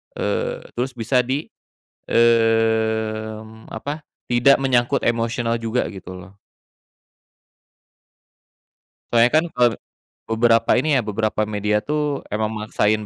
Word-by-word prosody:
eee, - - -2 0.2
terus 130 +2 -1
bisa 120 +2 +1
di, 135 +5 -3 0.6
mmm, 110 -1 +1
apa, 145 +7 -5 0.3
tidak 120 +3 +5
menyangkut 125 -3 +1
emosional 115 0 0
juga, 115 +2 -1
gitu, 95 -2 -9
loh. 95 +2 -14 2.7
Soalnya 120 +1 +5
kan 155 +2 +4
kalau 125 -3 +3 0.6
beberapa 115 0 +2
ini, 150 -2 +2
ya, - - +2
beberapa 110 0 -1
media, 105 0 0
tuh, 150 +5 -2
emang 110 0 0
maksain 105 0 0
115 Hz, 105 wpm, -21 LUFS, 110-125 Hz, 2.7 s, tidak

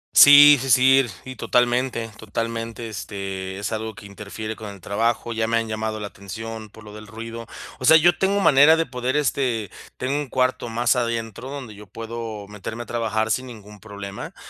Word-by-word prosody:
Sí, 145 0 +9
sí, 135 - -4
sí, 130 +2 +5 0.2
y 130 0 -8
totalmente, 120 -1 0
totalmente, 115 +1 -4
este, 95 -2 -6
es 100 - -4
algo 110 0 -4
que 105 +1 -12
interfiere 105 +2 -7
con 110 -1 -8
el 100 -1 -11
trabajo, 115 +5 -1
ya 110 0 -1
me 115 0 +1
han 115 -1 -1
llamado 110 0 -3
la 105 - -5
atención 110 +2 -8
por 110 +1 -15
lo 105 0 -12
del 105 0 -11
ruido, 115 +1 -8 0.3
o 130 - -3
sea, 160 - +8
yo 175 +2 +4
tengo 195 +1 +1
manera 150 -3 +6
de 165 - +1
poder, 125 0 -3
este, 125 -7 -1 0.3
tengo 130 +2 -2
un 145 - -4
cuarto 130 -2 0
más 120 +2 +1
adentro 115 +1 -3
donde 135 -6 -7
yo 105 0 -13
puedo 115 0 -7
meterme 105 +3 -7
a - - -16
trabajar 110 -2 -1
sin 130 +3 -1
ningún 105 -3 -12
problema, 100 -1 -8
115 Hz, 190 wpm, -22 LUFS, 105-125 Hz, 0.3 s, Sí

